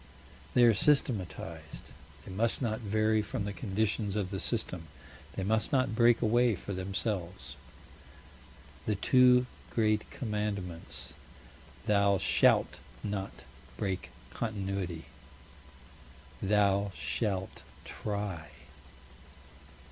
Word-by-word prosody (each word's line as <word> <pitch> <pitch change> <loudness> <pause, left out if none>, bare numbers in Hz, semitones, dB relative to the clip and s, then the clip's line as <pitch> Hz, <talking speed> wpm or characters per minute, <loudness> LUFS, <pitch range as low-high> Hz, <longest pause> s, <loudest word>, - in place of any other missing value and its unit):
They 125 - +6
are 115 -1 +7
systematized: 90 - 0 0.3
they - - -8
must 110 +5 +1
not 110 -4 -1
vary 110 0 +2
from 105 +1 -3
the 100 - -3
conditions 105 -1 -1
of 100 -3 -1
the 95 - -3
system: 90 -8 -1 0.5
they 95 - -3
must 110 +6 +1
not 130 -4 +2
break 115 0 +5
away 120 0 +4
for 100 +2 -6
themselves. 95 - -3 1.3
The 105 - +2
two 125 +3 +5 0.2
great 110 -2 +1
commandments: 105 -7 -3 0.7
Thou 100 -1 +4
shalt 65 -6 +3 0.2
not 100 -1 -4 0.3
break 95 -2 -2 0.2
Continuity; 100 -6 -3 1.4
Thou 100 0 +2
shalt 95 - -2 0.2
try. 100 -7 -4
100 Hz, 95 wpm, -31 LUFS, 95-110 Hz, 1.4 s, are